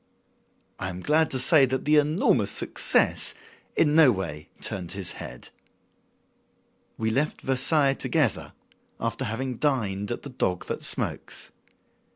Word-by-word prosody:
I 95 - -3
am 90 0 -7
glad 155 +1 +2
to 130 - -2
say 135 +2 +5
that 130 +1 -3
the 150 +1 +4
enormous 150 +4 +2
success - - +1 0.4
in 150 -2 +3
no 155 -4 +7
way 85 -7 -5
turned 90 -2 -4
his 95 -3 -3
head. - - -10 1.5
We 110 0 -1
left 145 +6 -1
Versailles 135 +2 +2
together, 140 - -1 0.5
after - - -3
having 125 +3 -4
dined 105 -9 -1
at 120 - -5
"The 140 - -7
Dog 90 -8 -2
That - - -5
Smokes." - - +1
130 Hz, 135 wpm, -26 LUFS, 100-150 Hz, 1.5 s, no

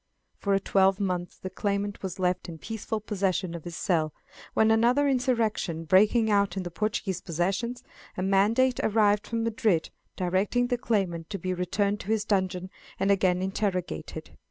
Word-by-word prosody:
For 200 -1 +1
a - - +3
twelvemonth 190 -2 +1
the 185 - -4
claimant 200 0 -2
was 190 -2 -5
left 180 -1 -1
in 165 - -7
peaceful 220 +3 -4
possession 195 -4 -1
of 170 -2 -7
his 170 -1 -6
cell, 160 -4 0 0.4
when 220 0 +4
another 240 +6 +4
insurrection 230 - 0
breaking 210 +6 +4
out 200 -2 +2
in 190 - -1
the 175 - -6
Portuguese 190 -1 -2
possessions, 195 +9 -2 0.3
a 185 - -1
mandate 215 +7 +3
arrived 210 -1 +2
from 230 -1 -1
Madrid, 220 -7 +1 0.2
directing 190 +7 +1
the 245 - +1
claimant 180 -9 -1
to 205 - -3
be 185 0 -2
returned 200 +3 0
to - - -9
his 220 -1 +1
dungeon, 185 -2 -1 0.3
and 195 +1 +2
again 185 -2 +2
interrogated. 190 - -3
195 Hz, 160 wpm, -27 LUFS, 180-220 Hz, 0.4 s, when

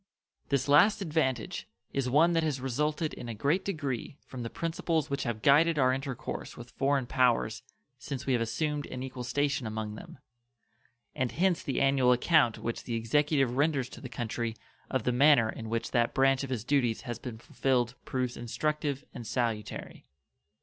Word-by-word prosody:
This 140 -2 +1
last 180 +10 +6
advantage 150 - -1 0.3
is 135 -2 0
one 160 +6 +4
that 165 - +3
has 150 -4 -1
resulted 150 +5 -1
in 120 - -7
a 115 - -4
great 145 - +1
degree 145 - -3
from 130 - -7
the 115 - -4
principles 165 -2 -1
which 140 - -1
have 115 -3 -3
guided 155 +3 +5
our 130 -2 +4
intercourse 135 -2 -5
with 120 0 -10
foreign 135 -1 +1
powers 120 -4 +2 0.4
since 135 0 -5
we 135 - +1
have 120 - +2
assumed 150 +5 -1
an 130 0 -6
equal 130 -1 -6
station 135 0 0
among 110 -1 -4
them, 110 - -10 1.0
and 130 -2 -1
hence 180 -1 +2
the 135 - -2
annual 135 -2 +4
account 125 -1 +4
which 115 - -4
the 120 - -2
Executive 135 +2 +1
renders 140 -3 +1
to - - -11
the 130 - -7
country 115 -1 -3 0.3
of 130 -4 -1
the 125 - +1
manner 125 -2 +5
in 110 -1 -7
which 115 0 -2
that 120 -2 +1
branch 135 0 +3
of 135 - -5
his 125 -5 -2
duties 125 -4 +1
has 120 -2 -5
been 120 -3 -7
fulfilled 120 +1 0
proves 125 -2 -2
instructive 145 +3 -2
and 120 -4 -7
salutary. 115 -4 -3
130 Hz, 175 wpm, -30 LUFS, 120-145 Hz, 1.0 s, last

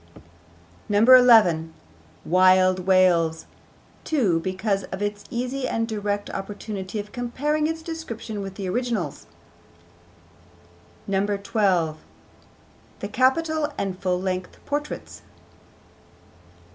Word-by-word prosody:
11. 210 -7 +6 0.5
'Wild 185 +1 +4
Wales,' 175 -4 +3 0.6
too, 215 - +1
because 190 +3 -2
of 190 - -7
its 205 0 -3
easy 255 +2 -3
and 225 -1 -1
direct 205 -2 -3
opportunity 200 0 -6
of 205 0 -7
comparing 290 +5 -1
its 325 0 -4
description 235 -11 -6
with 195 -1 -7
the 195 -2 -5
originals. 235 -1 -3 1.8
12. 195 -4 0 1.0
The - - -5
capital 310 +3 +1
and 190 -2 -3
full 180 -2 0
length 185 -1 -4
portraits. 290 +1 -5
205 Hz, 90 wpm, -24 LUFS, 185-245 Hz, 1.8 s, 11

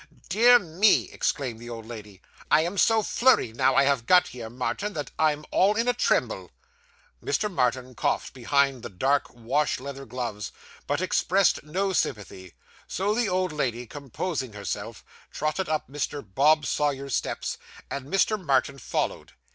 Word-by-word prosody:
'Dear 235 +5 +7
me!' 195 +1 +2
exclaimed 125 -5 -2
the 120 +1 -9
old 115 -2 -7
lady. 105 -4 -10 0.3
'I 155 - +5
am 175 +4 -2
so 225 -1 +4
flurried, 235 - +3
now 135 - +3
I 140 - +6
have 135 -4 +1
got 180 -1 +5
here, 115 -3 -8
Martin, 125 - -3
that 150 -4 -5
I'm 150 -1 +1
all 200 +3 +3
in 230 +2 0
a 245 - +3
tremble.' 245 - 0 0.7
Mr. 215 - -1
Martin 130 -2 0
coughed - - -1
behind 135 0 +1
the - - -7
dark 135 +9 +1
wash 125 +6 -1
leather 135 +1 -8
gloves, 115 -4 -4 0.4
but 145 +4 0
expressed 185 +1 +2
no 190 +6 -1
sympathy; 95 - -3 0.3
so 200 +3 -1
the 230 -1 0
old 185 -1 0
lady, 125 -5 -2
composing 140 - -5
herself, 105 -1 -6 0.3
trotted 155 +4 -2
up 155 -1 -1
Mr. 145 -1 -4
Bob 145 +9 +3
Sawyer's 140 -2 -1
steps, - - -2 0.3
and 140 -1 -5
Mr. 195 +3 +1
Martin 140 -2 +1
followed. - - -3
140 Hz, 155 wpm, -26 LUFS, 125-185 Hz, 0.7 s, Dear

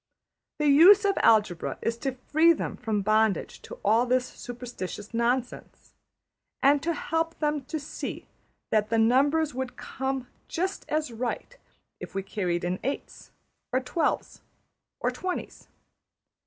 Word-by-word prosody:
The 300 - 0
use 350 +9 +8
of 395 -1 +3
algebra 205 -6 +3
is 230 - 0
to 265 0 -2
free 315 +6 +4
them - - -4
from 210 -3 -2
bondage 215 0 +1
to - - -9
all 235 +3 +4
this 250 0 +2
superstitious 240 -5 -7
nonsense, 240 +2 -2 0.7
and 285 +1 +5
help 325 0 -1
them 295 -2 -1
to 315 +3 -4
see 290 - -6 0.5
that 215 -1 +2
the 230 - +1
numbers 280 +7 +3
would 260 0 -4
come 265 -1 -3 0.2
just 370 +4 -3
as 305 -4 -1
right 245 - -4 0.4
if - - -9
we 195 - -1
carried 180 -3 -2
in 180 +1 -1
eights 275 +3 -5 0.4
or 255 - +2
twelves 300 +5 -2 0.6
or - - 0
twenties. 370 -1 -5
255 Hz, 135 wpm, -27 LUFS, 225-310 Hz, 0.7 s, use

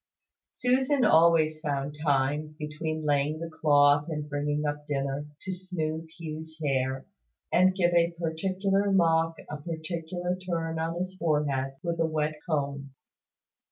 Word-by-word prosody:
Susan 260 +2 +2
always 160 -1 +5
found 145 -2 -2
time, 145 +1 +1
between 155 +1 -4
laying 145 +1 +1
the 165 +1 -6
cloth 145 -1 +4
and 150 -2 -3
bringing 145 +1 -1
up 145 0 -3
dinner, 140 0 -2 0.2
to 190 - -3
smooth 165 -3 -4
Hugh's 160 -1 -7
hair, 135 -3 -1 0.5
and 185 +1 +4
give 175 -2 +2
a 170 0 +4
particular 190 +4 0
lock 165 -3 +3
a 150 - -5
particular 170 +3 -4
turn 165 -3 -3
on 165 +1 -2
his 185 +1 -3
forehead 145 -5 0
with 170 -1 -2
a 165 - +3
wet 155 -1 -1
comb. 140 -3 -2
160 Hz, 135 wpm, -28 LUFS, 145-170 Hz, 0.5 s, always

